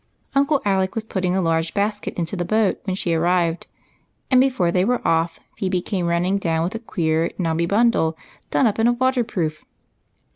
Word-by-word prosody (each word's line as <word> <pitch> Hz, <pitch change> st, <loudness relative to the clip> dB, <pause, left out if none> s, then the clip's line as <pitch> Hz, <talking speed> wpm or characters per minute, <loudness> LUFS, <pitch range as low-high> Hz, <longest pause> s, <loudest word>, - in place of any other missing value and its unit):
Uncle 280 Hz, +1 st, +2 dB
Alec 190 Hz, -1 st, +1 dB
was 225 Hz, -, -2 dB
putting 185 Hz, -4 st, -1 dB
a 190 Hz, -, +1 dB
large 165 Hz, 0 st, 0 dB
basket 205 Hz, +1 st, -1 dB
into 170 Hz, +2 st, -2 dB
the 175 Hz, -, -2 dB
boat 215 Hz, +2 st, +1 dB
when 190 Hz, -2 st, -1 dB
she 175 Hz, -3 st, -1 dB
arrived, 170 Hz, 0 st, +1 dB, 0.6 s
and 255 Hz, -1 st, +6 dB
before 250 Hz, -11 st, +1 dB
they 180 Hz, +1 st, +2 dB
were 245 Hz, +4 st, 0 dB
off 165 Hz, 0 st, +1 dB, 0.2 s
Phebe 185 Hz, -2 st, 0 dB
came 180 Hz, -4 st, -2 dB
running 175 Hz, +3 st, +1 dB
down 165 Hz, -3 st, 0 dB
with 180 Hz, +5 st, -2 dB
a 225 Hz, -, -4 dB
queer, 165 Hz, -7 st, 0 dB
knobby 170 Hz, -1 st, 0 dB
bundle 200 Hz, -6 st, +2 dB, 0.3 s
done -, -, +2 dB
up 220 Hz, -1 st, +1 dB
in 225 Hz, -, +4 dB
a 240 Hz, -, +4 dB
water 255 Hz, 0 st, +1 dB
proof. 160 Hz, -8 st, -3 dB
185 Hz, 190 wpm, -22 LUFS, 170-220 Hz, 0.6 s, and